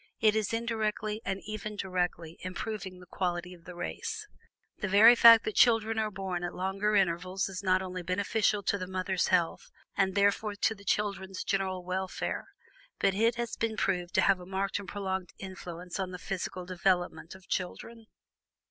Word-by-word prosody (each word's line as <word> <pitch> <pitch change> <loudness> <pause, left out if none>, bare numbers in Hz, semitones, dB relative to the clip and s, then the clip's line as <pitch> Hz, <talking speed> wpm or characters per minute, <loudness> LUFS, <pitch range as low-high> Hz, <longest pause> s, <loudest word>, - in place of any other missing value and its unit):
It 215 -1 +4
is 215 -3 0
indirectly, 220 -2 -1
and 195 0 -2
even 215 0 -5
directly, 175 -4 -2
improving 185 0 -5
the 180 - -13
quality 180 -1 -3
of 170 -2 -16
the 180 - -9
race. 175 - -4 0.5
The 205 - -1
very 210 +5 +8
fact 230 -1 +9
that 215 - -2
children 225 -1 +4
are 215 -1 0
born 190 -3 -4
at 175 - -4
longer 195 +3 0
intervals 185 0 +1
is 190 -1 -5
not 185 -1 +2
only 185 -1 -5
beneficial 200 +3 +1
to 200 - 0
the 185 - -4
mother's 185 0 0
health, 175 -3 +1 0.3
and 190 -1 +1
therefore 200 +1 +2
to 210 +2 +1
the 200 -2 -15
children's 195 -2 -1
general 190 -2 -1
welfare, 185 +1 -3 0.5
but 195 - +2
it 225 +4 +2
has 235 -1 -3
been 225 -1 -2
proved 180 -3 -1
to - - +5
have 195 -2 +4
a 180 - -10
marked 195 +1 -1
and 200 - -9
prolonged 190 -3 -3
influence 180 -1 -7
on 190 -1 -1
the 185 - -6
physical 180 0 -4
development 175 -2 0
of 190 -1 -16
children. 225 +5 -4
190 Hz, 175 wpm, -30 LUFS, 180-210 Hz, 0.5 s, fact